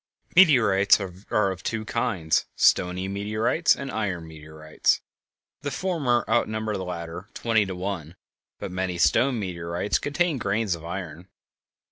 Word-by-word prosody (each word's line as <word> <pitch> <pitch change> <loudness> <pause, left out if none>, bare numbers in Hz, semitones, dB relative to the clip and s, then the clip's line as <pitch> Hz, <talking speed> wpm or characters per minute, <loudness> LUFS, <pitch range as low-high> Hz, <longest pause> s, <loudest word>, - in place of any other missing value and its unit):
Meteorites 110 - +6
are 95 +1 -1
of 95 - -7
two 110 -1 -3
kinds: 95 -10 0
stony 90 +1 +2
meteorites 110 - +1
and 135 -1 -6
iron 95 -7 -3
meteorites. 80 0 -1 0.6
The 145 - -3
former 145 -7 0
outnumber 110 -2 0
the 95 - -3
latter 85 +2 -6
twenty 110 -3 +1
to 95 - -5
one; 90 -3 -5 0.4
but - - -6
many 90 -1 -2
stone 120 - +3
meteorites 85 0 -2
contain 150 0 0
grains 100 -1 0
of 85 -1 -7
iron. 85 -1 -6
100 Hz, 130 wpm, -25 LUFS, 85-115 Hz, 0.6 s, Meteorites